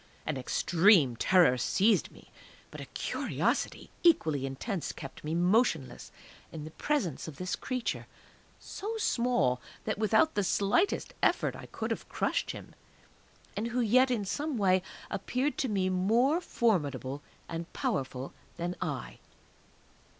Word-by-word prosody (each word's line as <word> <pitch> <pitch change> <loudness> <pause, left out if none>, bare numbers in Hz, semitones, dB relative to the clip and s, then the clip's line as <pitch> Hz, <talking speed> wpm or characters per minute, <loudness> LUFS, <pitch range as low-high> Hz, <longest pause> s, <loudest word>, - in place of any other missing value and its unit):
An 155 - -1
extreme 160 - +4
terror 165 -2 +4
seized 205 - +3
me; - - -18 0.4
but - - -8
a - - -6
curiosity - - -2
equally 155 - +3
intense 170 - -3
kept 135 -3 -10
me 155 +2 -2
motionless 175 - +1 0.4
in 155 -2 -7
the 155 - -8
presence 215 - -1
of 155 - -7
this 185 0 -2
creature 255 -3 -3 0.5
so 440 +3 -5
small 240 - +1 0.2
that 215 -1 -2
without 220 +9 +3
the 205 - +1
slightest 205 - +1
effort - - +2
I - - -9
could - - -4
have - - -4
crushed - - -1
him, - - -7 0.8
and 215 +3 -2
who 240 +1 -2
yet 250 +3 +4
in 225 -5 0
some 290 +6 -2
way 190 -3 +3 0.3
appeared 255 +8 -1
to 265 - 0
me 195 -3 +1
more 230 - +2
formidable 145 - 0 0.3
and 165 0 -5
powerful 130 0 -3 0.2
than 175 +1 -3
I. - - -4
190 Hz, 135 wpm, -30 LUFS, 155-240 Hz, 0.8 s, extreme